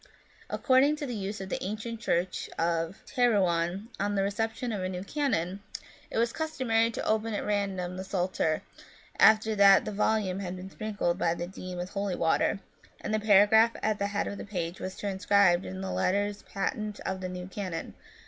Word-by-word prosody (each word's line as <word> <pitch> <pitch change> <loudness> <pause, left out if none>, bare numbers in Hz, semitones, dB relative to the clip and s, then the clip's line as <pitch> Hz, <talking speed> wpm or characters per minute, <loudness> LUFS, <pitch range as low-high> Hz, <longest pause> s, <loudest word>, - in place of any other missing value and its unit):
According 270 +3 +3
to 300 -1 -5
the 250 - -4
use 205 -1 -4
of 190 - -6
the - - -3
ancient 215 +3 -4
church 180 -4 -1
of 165 +3 -1
Terouanne, 190 -5 +1
on 205 +1 0
the 195 - +2
reception 225 +4 -2
of 205 -3 -3
a 185 - -2
new 180 0 -4
canon, 195 - -1 0.5
it - - -4
was 235 +1 +2
customary 255 -8 +1
to 230 - -4
open 220 0 0
at - - -3
random 195 -3 -1
the 190 - -4
Psalter, 180 -4 -1 0.6
after 220 0 +6
that 200 -2 +6
the - - -3
volume 205 -2 0
had 185 -2 -4
been 185 +1 -8
sprinkled 200 -5 -2
by 170 -2 +1
the 170 - -4
dean 185 0 -7
with 180 +1 -5
holy 200 -2 -2
water, 165 +4 +1 0.4
and 215 - -4
the 215 - +2
paragraph 215 +2 +6
at 215 -1 +1
the 200 - 0
head 205 0 -1
of 200 - -5
the - - -5
page 180 -3 -4
was 185 0 -6
transcribed 195 -2 +3
in 95 0 -6
the 95 -1 -3
letters 200 - 0
patent 210 +1 -2
of 190 0 -3
the 185 - -3
new 180 0 -6
canon. 185 -3 -5
200 Hz, 190 wpm, -29 LUFS, 180-215 Hz, 0.6 s, after